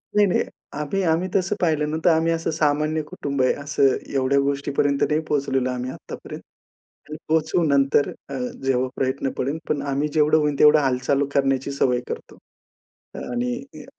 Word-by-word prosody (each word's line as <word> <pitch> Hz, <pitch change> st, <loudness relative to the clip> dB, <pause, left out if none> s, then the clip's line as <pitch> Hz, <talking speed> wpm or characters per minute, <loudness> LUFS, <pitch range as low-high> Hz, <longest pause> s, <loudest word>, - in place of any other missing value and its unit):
नाही, 210 Hz, 0 st, +6 dB
नाही. 180 Hz, -, +1 dB, 0.4 s
आम्ही 150 Hz, +7 st, -1 dB
आम्ही 165 Hz, +2 st, +1 dB
तसं 195 Hz, +1 st, +1 dB
पाहिलं 155 Hz, -4 st, +1 dB
ना 155 Hz, -, -1 dB
तर -, -, +7 dB
आम्ही 165 Hz, 0 st, +3 dB
असं 165 Hz, 0 st, -2 dB
सामान्य 155 Hz, 0 st, +1 dB
कुटुंब 140 Hz, -2 st, -3 dB
आहे, 130 Hz, -, +3 dB
असं 140 Hz, -2 st, +1 dB, 0.2 s
एवढ्या 135 Hz, 0 st, +2 dB
गोष्टीपर्यंत 140 Hz, 0 st, 0 dB
नाही 150 Hz, 0 st, +2 dB
पोहचलेलो 135 Hz, -3 st, 0 dB
आम्ही 125 Hz, 0 st, -3 dB
आत्तापर्यंत. -, -, -9 dB, 0.7 s
पण 155 Hz, -, -6 dB
पोहचू 160 Hz, +2 st, +2 dB
नंतर 140 Hz, -1 st, +3 dB, 0.2 s
अ, 140 Hz, -, -6 dB, 0.3 s
जेव्हा 130 Hz, -1 st, +1 dB
प्रयत्न 135 Hz, +1 st, -1 dB
पडेल, 140 Hz, +5 st, -1 dB
पण 145 Hz, -2 st, 0 dB
आम्ही 145 Hz, +2 st, 0 dB
जेवढं 155 Hz, 0 st, +4 dB
होईल 150 Hz, -2 st, 0 dB
तेवढं 150 Hz, +1 st, +7 dB
हालचाल 135 Hz, +1 st, +1 dB
करण्याची 135 Hz, 0 st, +1 dB
सवय 125 Hz, -3 st, +1 dB
करतो. -, -, -7 dB, 0.8 s
आणि 125 Hz, 0 st, -2 dB, 0.3 s
अ, -, -, -13 dB
145 Hz, 165 wpm, -23 LUFS, 135-155 Hz, 0.8 s, तर